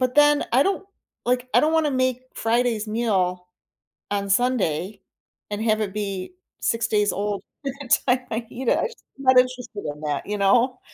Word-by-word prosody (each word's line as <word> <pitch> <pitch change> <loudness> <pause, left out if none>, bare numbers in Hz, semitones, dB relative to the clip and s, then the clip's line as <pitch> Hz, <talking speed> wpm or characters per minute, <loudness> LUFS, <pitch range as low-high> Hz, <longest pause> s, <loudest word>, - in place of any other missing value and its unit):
but 255 0 0
then, 295 0 +5
I 255 +3 +6
don't 390 0 0 0.4
like, 250 0 0
I - - +7
don't 310 +1 +2
wanna 320 -2 +2
make 255 -1 0
Friday's 230 -1 +1
meal 190 -5 0 0.7
on 200 -1 -1
Sunday 195 -4 +1 0.5
and 205 +1 -2
have 215 -1 +2
it 200 -3 -2
be 200 - -4 0.3
6 230 0 0
days 210 -2 +2
old 205 0 -2 0.2
by 275 - -2
the 270 - -9 0.2
time 250 -1 +3
I 225 +1 -3
eat 245 +1 -6
it. - - +3
I'm - - +1
just 470 - -16 0.2
not 260 -1 +4
interested 250 -4 +1
in 150 - -15
that, 150 -2 -2
you 210 0 -3
know. 245 +6 +3
230 Hz, 185 wpm, -23 LUFS, 205-255 Hz, 0.7 s, I